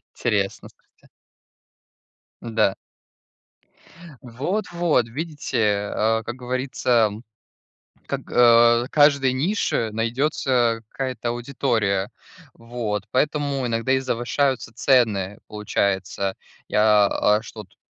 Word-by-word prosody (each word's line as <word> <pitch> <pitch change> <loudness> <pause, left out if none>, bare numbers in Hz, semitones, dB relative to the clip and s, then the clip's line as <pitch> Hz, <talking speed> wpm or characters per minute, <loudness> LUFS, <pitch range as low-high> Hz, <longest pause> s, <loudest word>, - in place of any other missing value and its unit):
Интересно, 100 -4 -1
слушайте. - - -29 1.3
Да. 110 -4 +1 1.5
Вот-вот, 170 - -1
видите, 115 -7 -2
а, 110 +1 +1
как 115 - -6
говорится, 125 -3 0 1.0
как - - -3
а, 120 0 +5
каждой 140 -3 +4
нише 135 - -1
найдётся 120 0 0
какая-то 130 -2 -4
аудитория. 120 -6 -1 0.4
Вот, 115 -4 -4
поэтому 140 -1 0
иногда 115 +2 -1
и 130 - +3
завышаются 130 0 -1
цены. 105 -7 +1
Получается, 100 -2 -2 0.3
я, 105 -1 +4
а, 105 +1 +1
что 110 -1 -10
тут, 90 - -30
120 Hz, 85 wpm, -22 LUFS, 105-130 Hz, 1.5 s, а